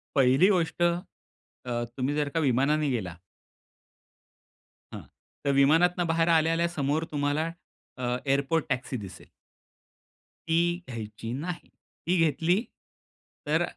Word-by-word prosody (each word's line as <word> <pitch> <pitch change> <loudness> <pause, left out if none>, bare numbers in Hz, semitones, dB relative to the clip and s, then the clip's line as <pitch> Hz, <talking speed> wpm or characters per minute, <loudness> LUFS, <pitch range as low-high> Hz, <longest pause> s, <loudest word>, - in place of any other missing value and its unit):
पहिली 135 +6 +5
गोष्ट. 175 -3 0
अ, 175 +1 +1 0.9
तुम्ही 135 +3 -1
जर 145 -1 0
का 165 - -1
विमानाने 145 +2 +2
गेला 95 -9 -3 1.8
हां. - - -6 0.4
तर 140 - +3
विमानातून 165 +6 +4
बाहेर 165 +1 +2
आल्या-आल्या 165 +1 +3
समोर 150 -1 -1
तुम्हाला. 150 +2 0 0.5
अ, 125 -1 -1
एअरपोर्ट 140 +4 +1
टॅक्सी 125 0 -2
दिसेल 95 -4 -10 1.2
ती 170 +2 +1
घ्यायची 115 -1 -6
नाही. 165 +6 -5 0.4
ती 180 +1 +3
घेतली. 165 +6 +1 0.9
तर - - +2
150 Hz, 110 wpm, -27 LUFS, 130-165 Hz, 1.8 s, पहिली